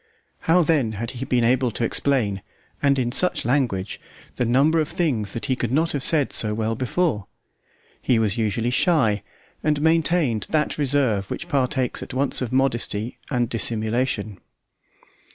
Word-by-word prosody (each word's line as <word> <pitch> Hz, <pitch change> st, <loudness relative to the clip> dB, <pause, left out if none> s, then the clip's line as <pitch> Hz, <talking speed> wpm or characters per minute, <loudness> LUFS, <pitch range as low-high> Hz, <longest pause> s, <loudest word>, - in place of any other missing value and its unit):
How 175 Hz, +2 st, +5 dB
then 145 Hz, -9 st, +1 dB
had 115 Hz, +3 st, -4 dB
he 130 Hz, 0 st, -6 dB
been 125 Hz, -2 st, +1 dB
able 125 Hz, +1 st, +2 dB
to 115 Hz, -, -4 dB
explain, 115 Hz, -6 st, 0 dB, 0.4 s
and 140 Hz, -1 st, +3 dB
in 120 Hz, -2 st, 0 dB
such 180 Hz, 0 st, +1 dB
language, 120 Hz, -7 st, -1 dB, 0.4 s
the 125 Hz, -, +1 dB
number 140 Hz, +7 st, +3 dB
of 155 Hz, -, 0 dB
things 125 Hz, -, -1 dB
that 115 Hz, -, -4 dB
he 130 Hz, -, 0 dB
could 120 Hz, -2 st, -3 dB
not 160 Hz, +4 st, +1 dB
have 145 Hz, -, -2 dB
said 150 Hz, -2 st, +1 dB
so 105 Hz, -1 st, +1 dB
well 110 Hz, 0 st, -1 dB
before? 130 Hz, -, -1 dB, 0.7 s
He 125 Hz, -, +2 dB
was 110 Hz, -2 st, +1 dB
usually 115 Hz, +1 st, -1 dB
shy, 125 Hz, -, +2 dB, 0.4 s
and 150 Hz, -1 st, +1 dB
maintained 160 Hz, -6 st, +1 dB
that 155 Hz, -1 st, 0 dB
reserve 130 Hz, -9 st, +1 dB
which 175 Hz, -, -5 dB
partakes 130 Hz, -4 st, 0 dB
at -, -, -7 dB
once 135 Hz, +1 st, +1 dB
of 125 Hz, -, -3 dB
modesty 120 Hz, -4 st, -1 dB
and 120 Hz, -3 st, 0 dB
dissimulation. 110 Hz, -2 st, -1 dB
125 Hz, 160 wpm, -23 LUFS, 110-145 Hz, 0.7 s, How